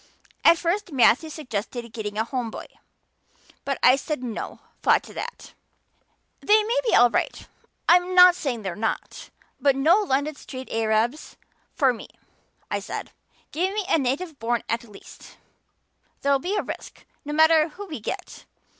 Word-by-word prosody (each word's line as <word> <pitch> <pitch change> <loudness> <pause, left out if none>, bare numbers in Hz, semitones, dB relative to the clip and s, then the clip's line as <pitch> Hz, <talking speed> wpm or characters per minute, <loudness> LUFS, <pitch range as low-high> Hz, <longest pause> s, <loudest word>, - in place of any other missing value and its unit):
At 335 - +7
first 365 +3 -2
Matthew 275 +3 +4
suggested 240 -5 -5
getting 210 -2 -5
a 220 - +2
Home 245 -1 -3
boy. - - -8 1.0
But 275 -1 -2
I 255 +2 +7
said 290 -1 -4
'no' 230 -3 -5 0.2
flat - - +3
to - - -13
that. 485 - -7 0.9
'They 425 +1 +4
may 470 +4 0
be - - +4
all 245 -1 +6
right - - -2 0.4
I'm 360 +1 +4
not 360 0 +9
saying 260 -10 -4
they're 190 -3 -4
not 220 +3 -4 0.3
but 280 -2 +3
no 320 +9 +4
London 300 -6 0
street 260 -2 -9
Arabs 225 +5 -1 0.4
for 265 -3 +3
me,' 230 - -10 0.6
I - - 0
said. - - -6 0.4
'Give 370 +6 -1
me 420 -2 -1
a 360 - +3
native 280 +4 -2
born 235 +1 -1
at 230 +1 -2
least. 210 -3 -15 0.9
There'll 280 0 +3
be 370 +9 -2
a 410 - 0
risk, - - -9 0.2
no 295 - -6
matter 315 +1 +5
who 395 +6 -9
we 315 -9 -7
get. 210 - -7
280 Hz, 160 wpm, -24 LUFS, 235-345 Hz, 1.0 s, not